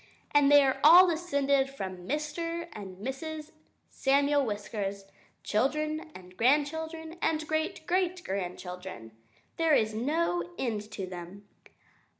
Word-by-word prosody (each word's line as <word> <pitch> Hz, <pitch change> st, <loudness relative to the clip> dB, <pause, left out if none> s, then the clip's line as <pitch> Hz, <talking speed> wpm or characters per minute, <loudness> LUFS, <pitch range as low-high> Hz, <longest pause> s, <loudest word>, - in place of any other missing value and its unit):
And 290 Hz, -1 st, +5 dB
they 290 Hz, -1 st, +8 dB
are 265 Hz, -1 st, +1 dB
all 345 Hz, +5 st, +10 dB
descended 280 Hz, -5 st, +1 dB
from 185 Hz, -8 st, -7 dB
Mr. 330 Hz, +4 st, -3 dB
and 190 Hz, -3 st, -8 dB
Mrs. 300 Hz, -, -6 dB, 0.4 s
Samuel 280 Hz, +1 st, +2 dB
Whiskers 205 Hz, -3 st, -4 dB, 0.4 s
children 305 Hz, +8 st, -1 dB
and 180 Hz, 0 st, -13 dB
grandchildren 320 Hz, -, 0 dB
and 310 Hz, -1 st, 0 dB
great 315 Hz, +2 st, -2 dB
great 365 Hz, +1 st, 0 dB
grandchildren. 180 Hz, -, -6 dB, 0.5 s
There 325 Hz, -2 st, +4 dB
is 215 Hz, -3 st, +1 dB
no 220 Hz, -, -1 dB
end 215 Hz, -4 st, -3 dB
to 195 Hz, -, -4 dB
them! 185 Hz, +2 st, -9 dB
275 Hz, 120 wpm, -29 LUFS, 200-315 Hz, 0.5 s, all